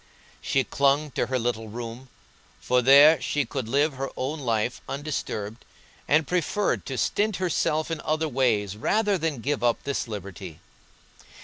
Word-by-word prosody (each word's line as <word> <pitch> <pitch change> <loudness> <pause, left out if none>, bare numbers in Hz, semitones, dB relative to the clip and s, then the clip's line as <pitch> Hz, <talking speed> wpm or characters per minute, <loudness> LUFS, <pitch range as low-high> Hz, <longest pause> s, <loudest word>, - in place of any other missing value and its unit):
She 135 - +1
clung 140 +3 +1
to - - -1
her 130 - 0
little 115 -2 -2
room, 120 +3 -7 0.5
for 125 0 +2
there 145 +5 +7
she 145 -2 0
could 120 -1 -5
live 145 +4 +2
her 135 +1 -4
own 145 +5 -3
life 115 -2 -1
undisturbed, 130 -6 -4 0.4
and 155 +1 +3
preferred 180 +5 -1
to 135 - -4
stint 210 - 0
herself 165 -3 0
in 160 -2 -3
other 155 +1 0
ways 115 -8 0
rather 205 - +1
than 155 -6 -2
give 140 +1 -2
up 120 -1 +1
this 140 -3 -2
liberty. 100 -5 -8
135 Hz, 150 wpm, -25 LUFS, 120-155 Hz, 0.5 s, there